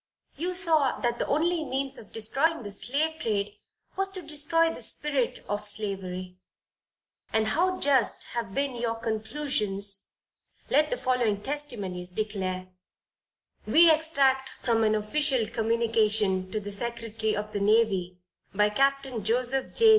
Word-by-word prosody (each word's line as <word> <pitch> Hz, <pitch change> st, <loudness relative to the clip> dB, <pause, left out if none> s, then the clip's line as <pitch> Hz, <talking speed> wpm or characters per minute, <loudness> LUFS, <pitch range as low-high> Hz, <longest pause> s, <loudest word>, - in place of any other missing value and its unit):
You 360 Hz, +5 st, -3 dB
saw 320 Hz, -7 st, +2 dB
that 240 Hz, -1 st, -1 dB
the -, -, -1 dB
only 330 Hz, +2 st, +1 dB
means 270 Hz, -1 st, -1 dB
of 210 Hz, -, -14 dB
destroying 270 Hz, +7 st, +1 dB
the 205 Hz, -, -7 dB
slave 305 Hz, +9 st, -2 dB
trade, 205 Hz, -2 st, -1 dB, 0.4 s
was 390 Hz, 0 st, +1 dB
to 370 Hz, -2 st, -7 dB
destroy 315 Hz, +2 st, +2 dB
the -, -, -9 dB
spirit 285 Hz, -5 st, 0 dB
of 205 Hz, +1 st, -3 dB
slavery; 185 Hz, -3 st, -4 dB, 0.9 s
and 220 Hz, 0 st, +2 dB
how 370 Hz, +3 st, +1 dB
just 275 Hz, -4 st, +3 dB
have 230 Hz, -5 st, -4 dB
been 275 Hz, -2 st, -1 dB
your 235 Hz, -1 st, -2 dB
conclusions, 215 Hz, -4 st, -1 dB, 0.6 s
let 300 Hz, +3 st, +4 dB
the -, -, -1 dB
following 240 Hz, -, 0 dB
testimonies 210 Hz, -12 st, -2 dB
declare 185 Hz, -2 st, -3 dB, 1.0 s
we 335 Hz, 0 st, +7 dB
extract 275 Hz, -4 st, +2 dB
from 230 Hz, -2 st, +2 dB
an 215 Hz, 0 st, +3 dB
official 250 Hz, +2 st, +1 dB
communication 220 Hz, -4 st, +1 dB
to 215 Hz, -, -1 dB
the 205 Hz, 0 st, -7 dB
secretary 225 Hz, 0 st, -3 dB
of 210 Hz, +1 st, -4 dB
the 205 Hz, -, -2 dB
Navy, 200 Hz, -4 st, +2 dB, 0.4 s
by 210 Hz, +1 st, +3 dB
Captain 275 Hz, -1 st, 0 dB
Joseph 250 Hz, +4 st, 0 dB
J. 455 Hz, -1 st, +6 dB
235 Hz, 140 wpm, -27 LUFS, 210-285 Hz, 1.0 s, we